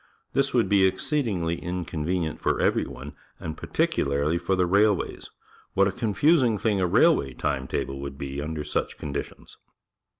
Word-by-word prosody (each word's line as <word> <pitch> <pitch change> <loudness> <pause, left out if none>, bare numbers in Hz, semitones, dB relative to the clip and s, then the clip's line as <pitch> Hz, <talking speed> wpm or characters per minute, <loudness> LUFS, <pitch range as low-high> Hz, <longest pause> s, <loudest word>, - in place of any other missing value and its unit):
This 140 0 +2
would 120 -2 +2
be 100 -2 +4
exceedingly 95 - -1
inconvenient 85 -1 -3
for - - +1
every - - +2
one, 70 +2 -9 0.3
and 80 -1 -5
particularly 70 +4 0
for 95 +2 0
the 90 -1 +2
railways. 100 +2 +1 0.5
What 100 0 +4
a - - 0
confus 130 - +3
i 125 - +4
n 110 -2 0
g - - -13
thing 105 -4 +2
a 90 - +2
railway 70 -5 +3
time 65 -1 -2
table 70 +1 -3
would 70 0 -6
be 70 0 -5
under 75 0 -4
such - - -2
conditions 70 -2 -6
85 Hz, 170 wpm, -26 LUFS, 75-100 Hz, 0.5 s, be